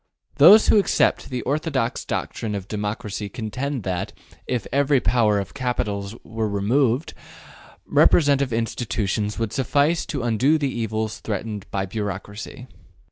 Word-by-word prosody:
Those 215 +1 +8
who 215 - +6
accept 200 - +1
the 125 -2 -3
orthodox 140 -4 -1
doctrine 105 -2 -3
of 100 -1 -5
democracy 105 0 -4
contend 125 +4 -4
that, 95 +2 -3 0.3
if 125 -2 -2
ever 140 +1 +3
the - - +5
power 105 -1 +2
of 100 -1 -4
capital 105 -7 -2
were 110 -1 -3
removed, 120 +7 +1 0.7
representative 140 -4 +4
institutions 110 -2 -2
would 115 -2 -2
suffice 145 +5 +1
to 140 -5 -3
undo 120 +7 +2
the 140 -3 -1
evils 110 -2 -3
threatened 105 -1 -5
by 95 -1 -2
bureaucracy. 105 +5 -6
115 Hz, 135 wpm, -23 LUFS, 105-135 Hz, 0.7 s, Those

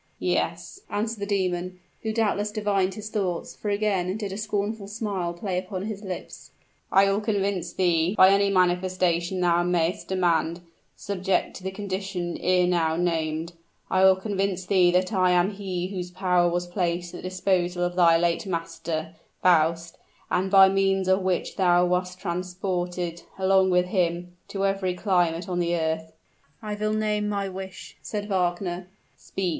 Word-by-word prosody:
"Yes," - - -2
answered 220 +1 -2
the 200 - -3
demon, 185 -2 -1 0.2
who 220 - -2
doubtless 210 -2 0
divined 200 -3 0
his 215 0 -7
thoughts, 185 -6 -2
for 210 - -4
again 200 -2 0
did 205 -3 -4
a - - -5
scornful 210 0 -2
smile 200 -4 -3
play 180 +1 -2
upon 185 0 -5
his 210 -1 -5
lips. 190 -4 -7 0.4
"I 195 +1 +6
will 195 +1 +1
convince 200 -3 -1
thee, 175 0 +1
by 185 0 +8
any 200 0 +3
manifestation 180 -1 +1
thou 175 -1 +3
may'st 175 +1 0
demand, 170 -2 +1 0.3
subject 190 -1 -1
to 185 - -13
the 190 - -2
condition 190 -3 -4
ere 180 0 +3
now 165 -3 +1
named, 165 -1 -1 0.4
I 185 0 +3
will 190 0 +7
convince 195 -1 -2
thee 180 -2 +4
that 185 +3 +1
I 185 -2 +3
am 180 +3 +3
he 185 -3 -4
whose 180 -2 -5
power 180 -1 +2
was 175 +1 -1
placed 175 -1 -2
at - - -6
the 185 - -4
disposal 180 -1 0
of 175 0 -1
thy 170 -2 +5
late 170 +3 0
master, 165 -2 -4 0.3
Faust, 165 -1 +2 0.3
and 185 +1 +1
by 195 0 +8
means 195 0 +1
of 190 +1 +3
which 185 -1 -1
thou 180 -2 +4
wast 180 +1 -1
transported, 180 -1 -3 0.2
along 190 0 +3
with 180 0 +3
him, 175 -1 -1
to 195 -1 -2
every 195 -2 0
climate 175 -3 +1
on 180 -1 -2
the 175 0 +1
earth." 160 0 -2 0.5
"I 210 -1 -5
will 215 +1 -1
name 210 -1 0
my 200 -1 -1
wish," 190 0 -8
said 205 -1 -4
Wagner. 180 -1 -1 0.3
"Speak!" 190 -2 -3
185 Hz, 165 wpm, -25 LUFS, 175-195 Hz, 0.5 s, by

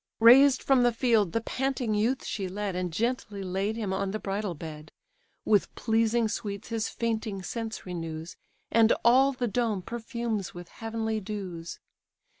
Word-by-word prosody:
Raised 255 +4 +7
from 270 -2 +4
the 245 0 +4
field 225 -5 +2
the 230 - 0
panting 260 -2 -1
youth 230 +5 0
she 195 -3 -3
led, 200 0 -3
And 180 -1 -2
gently 210 0 -2
laid 195 +3 -1
him 210 -4 -2
on 195 0 -1
the 210 - -2
bridal 200 -2 -3
bed, 155 0 -9 0.5
With 205 -3 +2
pleasing 225 0 +2
sweets 205 -2 -5
his 225 -2 -1
fainting 220 -4 -2
sense 225 +2 -5
renews, 165 -2 -5 0.4
And 230 -1 +5
all 260 +3 +6
the 250 -2 -2
dome 220 -4 0
perfumes 230 -4 -4
with 175 -1 -9
heavenly 225 -1 -3
dews. 185 -5 -6
220 Hz, 155 wpm, -28 LUFS, 190-235 Hz, 0.5 s, Raised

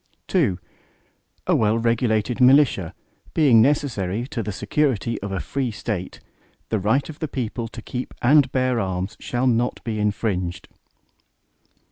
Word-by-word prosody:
II 90 - +2 0.9
A - - +3
well 110 0 +2
regulated 115 0 0
militia, 125 - +4 0.4
being 135 -8 +6
necessary 120 -6 0
to 120 - -3
the 105 - -4
security 115 +2 -1
of 100 0 -5
a 95 - -2
free 135 +3 -2
State, 105 -4 -5 0.5
the 110 - 0
right 110 +9 +1
of 160 - -10
the 155 - -2
people 120 -4 -4
to 115 0 -10
keep 125 0 -5
and 135 +1 +4
bear 130 -2 +1
arms, 95 +1 -3
shall 125 +1 -2
not 120 -1 +1
be 110 -2 -3
infringed. 100 -4 -2
115 Hz, 140 wpm, -23 LUFS, 105-130 Hz, 0.9 s, being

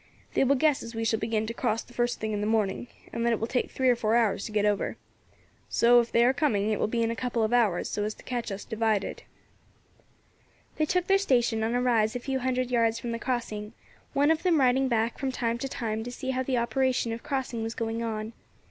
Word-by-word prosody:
They - - +3
will 275 +1 +3
guess 295 +1 +2
as 230 0 -8
we 225 0 -2
shall 220 0 +1
begin 220 -1 -1
to 230 - -4
cross 230 -2 -1
the 245 - -18
first 240 0 0
thing 220 0 -2
in 205 -1 -2
the 210 - -1
morning, 220 0 0 0.3
and 230 - -2
that 235 0 +3
it 225 - -1
will 225 - -1
take 250 +2 -1
three 260 - 0
or 250 - +5
four 225 -1 +1
hours 220 -4 +2
to 220 - -6
get 210 -1 +1
over. 205 -1 0 0.7
So, 240 +1 +5
if 235 0 -1
they 235 +1 +4
are 255 - +4
coming, 220 -7 +1
it 215 - 0
will - - +1
be 230 +1 0
in 230 - 0
a - - -3
couple 240 -1 -1
of 220 +2 0
hours, 220 -8 +2
so 205 - -2
as 215 +1 -3
to - - -16
catch 240 -4 -3
us 195 +1 -6
divided." 220 -3 -1 1.6
They 310 - +1
took 360 +1 +1
their 390 +1 +4
station 240 - +2
on 225 +2 0
a 245 - +2
rise 225 -3 +2
a - - -1
few 265 +2 -2
hundred 255 0 -1
yards 230 -2 +2
from 235 0 -4
the 230 - -3
crossing, 230 -4 -3 0.4
one 285 +3 +4
of 320 0 +1
them 345 -4 +3
riding 265 0 +3
back 230 -1 0
from 270 -1 -1
time 235 -2 -1
to 270 - -3
time 220 -3 -3
to 245 - -6
see 260 +1 -4
how 260 0 -1
the 260 -1 -1
operation 250 -1 +1
of 230 - -6
crossing 260 -4 -3
was 225 +1 -4
going 225 0 -2
on. 220 -1 -3
235 Hz, 255 wpm, -27 LUFS, 220-255 Hz, 1.6 s, or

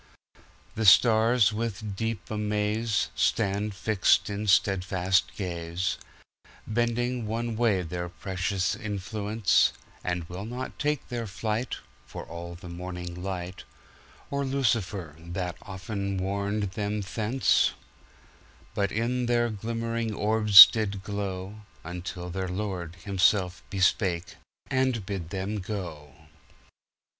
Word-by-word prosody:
The 110 -1 0
stars, 110 +1 +6
with 105 -2 -3
deep 110 0 -3
amaze, 105 +1 0
Stand 100 +1 0
fixed 105 +1 +2
in 105 +1 -3
steadfast 95 -1 +2
gaze, 85 -1 -3 0.7
Bending 120 +1 -1
one 115 +1 -2
way 110 -5 +2
their 85 +1 -4
precious 95 +1 -2
influence; 105 -1 +1 0.3
And 90 -2 -2
will 90 +4 -6
not 125 +3 -6
take 150 -1 -1
their 120 -2 -3
flight, 110 +5 -2 0.3
For - - -7
all 85 +1 -7
the 90 +1 -11
morning 90 0 -6
light, 90 0 -5 0.7
Or 140 0 0
Lucifer 110 - -1
that 85 +1 -4
often 100 0 -4
warned 100 +1 -1
them 105 0 -2
thence; 110 +6 +2 1.0
But 100 -2 0
in 120 +2 -1
their 120 -1 +2
glimmering 115 +1 -3
orbs 105 -1 +10
did 100 -3 -3
glow, 100 0 -4 0.2
Until 90 +1 -6
their 95 +1 -3
Lord 90 -3 -4
himself 90 0 +1
bespake, 95 -2 +1 0.3
and 130 -5 0
bid 95 -5 -4
them 100 +2 -3
go. 85 -7 -6
100 Hz, 110 wpm, -27 LUFS, 90-110 Hz, 1.0 s, orbs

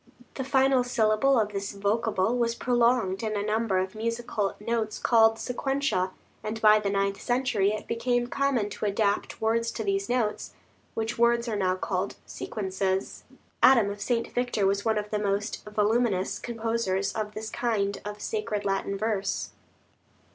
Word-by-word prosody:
The 265 - -4
final 265 -1 +3
syllable 245 +1 +3
of 210 -1 -1
this 200 +1 -3
vocable 205 +1 0
was 235 -1 +1
prolonged 235 -6 +2
in 215 -2 -2
a 205 - -2
number 215 -2 +1
of 185 +1 -1
musical 225 -2 -2
notes 220 0 -2
called 225 -1 +4
sequentia, 260 -6 -1 0.3
and 215 +1 -4
by 215 -1 +6
the 205 -1 -1
ninth 195 0 0
century 240 -5 +1
it 215 - -4
became 245 +1 0
common 250 -5 0
to 210 - -4
adapt 205 0 0
words 230 +1 +1
to 225 - -3
these 195 0 -1
notes, 240 -4 -1 0.4
which 225 +1 -2
words 235 0 +3
are 225 - -1
now 185 -2 +1
called 185 +1 -2
"sequences." 190 -2 -3 0.4
Adam 230 -6 +6
of 205 0 -8
St. 230 +2 -1
Victor 245 -5 0
was 200 +1 +1
one 220 -1 +1
of 210 0 -3
the 210 - 0
most 205 +1 -2
voluminous 210 -2 +1
composers 225 -4 -1
of 210 -1 -4
this 220 0 -5
kind 215 -5 -1
of 210 0 -7
sacred 215 -1 -2
Latin 195 0 -1
verse. 205 -2 -1
215 Hz, 160 wpm, -27 LUFS, 200-235 Hz, 0.4 s, by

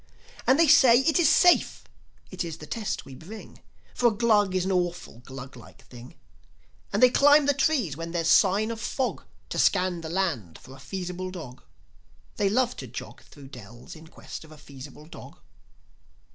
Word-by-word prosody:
And 260 - +5
they 330 0 +4
say, 260 -4 +6
"It 320 +5 +1
is 320 -4 +4
safe, 350 +3 +3 0.5
it - - -4
is 165 -2 -7
the 155 - -11
test 215 +4 -4
we 135 - -12
bring; 195 +11 -12 0.3
For 245 - +2
a - - +3
Glug 210 -4 +2
is 185 -1 0
an 190 - -1
awful 175 -8 -3
Gluglike 130 -1 -12
thing. 120 0 -14 0.8
And - - +1
they 250 - +7
climb 290 +2 +5
the 285 - +3
trees 270 - 0
when 165 +2 -6
there's 165 -1 -3
a - - +4
sign 210 +3 +3
of 225 -1 -7
fog, 260 +3 -3 0.3
To - - -4
scan 180 -2 +1
the 160 - -7
land 160 - -3
for 130 - -15
a - - -16
feasible 180 +5 -6
dog. 160 -9 -10 0.8
They 200 -1 +1
love 245 +3 0
to - - -8
jog - - -9
Thro' 145 -2 -16
dells 120 - -12
in 160 0 -14
quest - - -10
of 160 - -16
a 155 - -13
feasible 145 0 -13
dog." 160 - -13
180 Hz, 185 wpm, -26 LUFS, 145-235 Hz, 0.8 s, they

